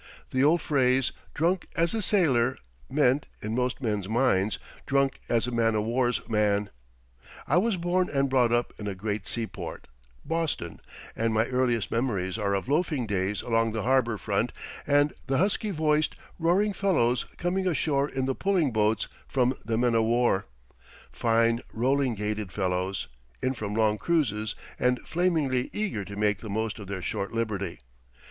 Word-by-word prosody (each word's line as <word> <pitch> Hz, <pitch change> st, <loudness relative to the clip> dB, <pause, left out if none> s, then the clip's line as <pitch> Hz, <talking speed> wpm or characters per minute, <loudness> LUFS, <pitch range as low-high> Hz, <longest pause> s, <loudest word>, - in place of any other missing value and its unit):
The 130 Hz, +1 st, +2 dB
old 155 Hz, +2 st, +4 dB
phrase, 130 Hz, -3 st, +2 dB, 0.2 s
"Drunk 175 Hz, +4 st, +1 dB
as 165 Hz, +3 st, +1 dB
a 225 Hz, -, 0 dB
sailor," 135 Hz, -, +3 dB, 0.3 s
meant, 140 Hz, 0 st, +2 dB, 0.2 s
in 110 Hz, +1 st, -2 dB
most 125 Hz, +2 st, -1 dB
men's 105 Hz, -4 st, -1 dB
minds, 110 Hz, -4 st, +2 dB, 0.3 s
drunk 135 Hz, -1 st, +2 dB
as 115 Hz, -1 st, +2 dB
a 125 Hz, -, -3 dB
man 115 Hz, -2 st, +2 dB
o' 105 Hz, -, +2 dB
war's 120 Hz, 0 st, 0 dB
man. 105 Hz, -2 st, +1 dB, 0.7 s
I 150 Hz, -, +2 dB
was 215 Hz, 0 st, +1 dB
born 180 Hz, +1 st, +1 dB
and 140 Hz, -1 st, +1 dB
brought 125 Hz, -3 st, +3 dB
up 120 Hz, 0 st, +1 dB
in 105 Hz, -, -5 dB
a 100 Hz, -, -3 dB
great 105 Hz, +1 st, -3 dB
seaport 115 Hz, -2 st, -4 dB, 0.4 s
Boston 160 Hz, -, -2 dB, 0.4 s
and 115 Hz, -1 st, 0 dB
my 110 Hz, +1 st, +3 dB
earliest 125 Hz, -4 st, 0 dB
memories 110 Hz, -5 st, -1 dB
are 100 Hz, -1 st, +1 dB
of 100 Hz, -, -3 dB
loafing 150 Hz, -3 st, +1 dB
days 100 Hz, -1 st, -1 dB
along 115 Hz, -1 st, +1 dB
the 110 Hz, -2 st, -2 dB
harbor 125 Hz, -3 st, +2 dB
front -, -, -1 dB, 0.4 s
and 145 Hz, 0 st, +3 dB
the 135 Hz, -1 st, +1 dB
husky 205 Hz, +5 st, +1 dB
voiced, 155 Hz, -3 st, +1 dB, 0.2 s
roaring 190 Hz, +5 st, +2 dB
fellows 145 Hz, -13 st, +1 dB
coming 185 Hz, +2 st, 0 dB
ashore 145 Hz, -4 st, +1 dB
in 130 Hz, -1 st, -2 dB
the 135 Hz, -, 0 dB
pulling 180 Hz, -4 st, +1 dB
boats 110 Hz, 0 st, +2 dB, 0.2 s
from 130 Hz, -1 st, +2 dB
the 110 Hz, 0 st, -1 dB
men 120 Hz, 0 st, +2 dB
o' 115 Hz, -, +4 dB
war; 115 Hz, -3 st, +2 dB, 0.6 s
fine, 115 Hz, +1 st, +2 dB
rolling 130 Hz, +1 st, +1 dB
gaited 105 Hz, -1 st, -3 dB
fellows, 95 Hz, 0 st, -1 dB, 0.3 s
in 130 Hz, -, 0 dB
from 105 Hz, -4 st, -4 dB
long 110 Hz, -1 st, +2 dB
cruises 110 Hz, -11 st, 0 dB, 0.2 s
and 125 Hz, 0 st, +2 dB
flamingly 160 Hz, -8 st, +1 dB
eager 205 Hz, -, -2 dB
to 100 Hz, +1 st, -8 dB
make 105 Hz, -1 st, +1 dB
the 110 Hz, -, -8 dB
most 110 Hz, +2 st, -2 dB
of 100 Hz, -, -8 dB
their 95 Hz, -2 st, -5 dB
short 100 Hz, +3 st, -2 dB
liberty. 100 Hz, -, -2 dB
120 Hz, 165 wpm, -27 LUFS, 110-145 Hz, 0.7 s, old